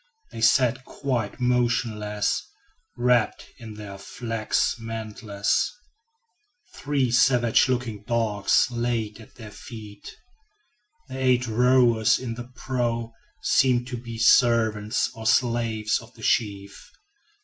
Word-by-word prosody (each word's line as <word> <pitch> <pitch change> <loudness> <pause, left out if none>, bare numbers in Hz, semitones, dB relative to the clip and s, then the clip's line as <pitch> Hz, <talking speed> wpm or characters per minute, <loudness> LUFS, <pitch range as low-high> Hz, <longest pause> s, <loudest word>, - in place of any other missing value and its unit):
They 115 - -8
sat 125 +2 +3
quite 125 -7 -3
motionless, 115 -4 0 0.5
wrapped 120 -2 +1
in 110 -3 -9
their 100 -2 -9
flax 115 +1 -2
mantles. 110 -3 -2 1.0
Three 140 -4 -1
savage 120 0 +3
looking 120 -5 -2
dogs 110 -2 +1
lay 120 -3 -2
at 110 - -16
their 110 -3 -11
feet. 105 -2 -11 0.9
The 130 - -7
eight 125 -2 +2
rowers 120 -1 +3
in 125 -3 -5
the 120 +1 -7
prow 120 -3 -2 0.3
seemed 125 -2 +3
to 125 - -4
be 115 -1 -8
servants 115 -3 +3
or 110 0 -5
slaves 115 -3 +1
of 120 +1 -16
the 110 - -14
chief. 100 -3 -1
115 Hz, 110 wpm, -25 LUFS, 110-125 Hz, 1.0 s, sat